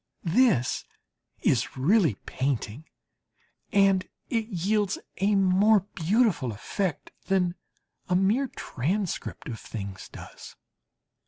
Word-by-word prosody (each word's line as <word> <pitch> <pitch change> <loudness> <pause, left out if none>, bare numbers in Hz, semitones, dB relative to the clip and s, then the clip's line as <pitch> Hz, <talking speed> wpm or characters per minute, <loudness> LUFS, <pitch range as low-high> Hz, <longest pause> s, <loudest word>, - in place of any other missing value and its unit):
This 175 - +3 0.6
is - - +1
really 160 - +3
painting, 130 0 -2 0.9
and 195 -2 +3 0.2
it 225 -3 0
yields 200 +1 0 0.2
a 200 +2 +2
more 195 +2 +5
beautiful 190 - +2
effect 160 - -3 0.2
than 180 -2 +2 0.6
a 180 - +3
mere 210 +9 +3
transcript 180 - -3
of 115 -5 -5
things 100 -3 -7
does. - - -11
190 Hz, 95 wpm, -27 LUFS, 140-210 Hz, 0.9 s, more